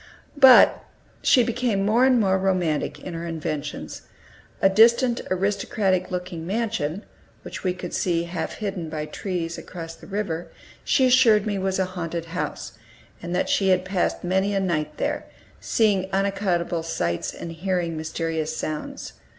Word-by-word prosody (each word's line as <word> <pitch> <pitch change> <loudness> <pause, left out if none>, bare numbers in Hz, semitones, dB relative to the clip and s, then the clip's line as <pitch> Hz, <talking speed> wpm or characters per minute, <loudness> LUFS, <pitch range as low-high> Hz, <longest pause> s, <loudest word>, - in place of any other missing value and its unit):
But 265 -3 +7 0.4
she 250 - +5
became 235 -4 0
more 230 +5 +4
and 255 -2 +4
more 190 -3 +2
romantic 180 -5 0
in 180 - -6
her 165 +1 -5
inventions. 155 -3 -5 0.6
A - - +5
distant 235 +5 +4
aristocratic 190 -1 0
looking 180 -2 -5
mansion, 205 -5 -2 0.4
which - - -8
we 180 -1 0
could 180 -1 -7
see 170 -2 0
half 170 -1 -4
hidden 195 -6 -4
by 155 -1 -4
trees, 170 -1 -4
across 165 -2 -8
the - - -15
river, 190 -5 -3 0.4
she 265 - +3
assured 245 -5 +5
me 205 -2 -1
was 190 0 -1
a 190 - +1
haunted 170 -2 -5
house, 180 - -5 0.4
and 175 +1 -4
that 180 - +1
she 195 -1 +2
had 185 0 +3
passed 185 -1 -1
many 190 +3 +1
a - - +2
night 155 -5 -2
there, - - -2 0.3
seeing 200 -5 +1
unaccountable 190 -3 0
sights, 85 - -2
and 170 - -7
hearing 175 0 -2
mysterious 160 0 -3
sounds. 155 -1 -5
185 Hz, 150 wpm, -24 LUFS, 165-200 Hz, 0.6 s, But